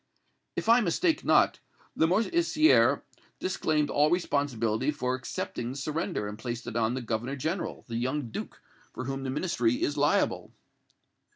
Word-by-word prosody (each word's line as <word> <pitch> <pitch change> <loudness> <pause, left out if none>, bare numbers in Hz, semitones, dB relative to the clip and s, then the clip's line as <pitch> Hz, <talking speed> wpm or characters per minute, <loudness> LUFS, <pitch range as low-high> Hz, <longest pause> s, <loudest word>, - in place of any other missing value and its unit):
"If - - -3
I 235 +2 +6
mistake 315 - +1
not, - - +4 0.4
Lamoricière 310 - +3 0.3
disclaimed 155 -5 0
all 150 +1 +3
responsibility 135 -8 0
for 130 -4 -1
accepting 120 -1 -4
the - - -8
surrender, 155 - -2
and 105 +1 -7
placed 120 0 -5
it - - -6
on 115 +1 +1
the 130 - -4
Governor 115 +4 -2
General, 160 +7 -3
the 115 -2 -3
young 130 0 -2
Duke, - - -7 0.3
for - - -5
whom 135 +1 -3
the 135 - -3
Ministry 130 -5 0
is 145 - 0
liable?" 145 +1 +1
140 Hz, 150 wpm, -28 LUFS, 120-165 Hz, 0.4 s, I